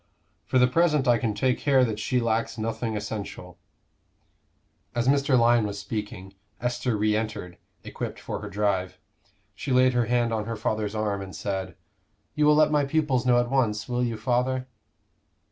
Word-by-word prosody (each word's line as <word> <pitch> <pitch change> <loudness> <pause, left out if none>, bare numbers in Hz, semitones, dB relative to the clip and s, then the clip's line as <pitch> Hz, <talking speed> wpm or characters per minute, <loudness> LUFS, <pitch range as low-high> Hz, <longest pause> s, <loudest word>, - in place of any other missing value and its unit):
For - - +1
the 125 - +6
present 150 0 +2
I 120 -2 +4
can 110 -2 -1
take 130 +2 +1
care 135 -3 +4
that 110 -3 -3
she 125 +4 0
lacks 115 -1 -1
nothing 110 0 -2
essential." 100 -4 -6 1.4
As 120 +1 0
Mr. 140 -1 +3
Lyon 120 -2 +4
was 100 0 -5
speaking, 100 -2 -6 0.3
Esther 120 0 -1
re 105 +1 +2
entered, 105 -5 -4 0.2
equipped - - -6
for - - -5
her 105 - -6
drive. 100 -2 -1 0.6
She 140 - -5
laid 130 0 +4
her 120 -2 +1
hand 120 -1 +1
on 110 -1 -1
her 115 +1 -3
father's 110 -1 -2
arm 105 -2 -1
and 95 -3 -8
said, 95 0 -4 0.6
"You 150 0 +2
will 150 - +6
let 155 0 +4
my 150 -1 +3
pupils 140 -4 0
know 120 -1 +5
at 120 0 -1
once, 105 -6 +1
will 125 0 -1
you, 115 -2 -2
father?" 125 +3 0
115 Hz, 175 wpm, -26 LUFS, 105-130 Hz, 1.4 s, the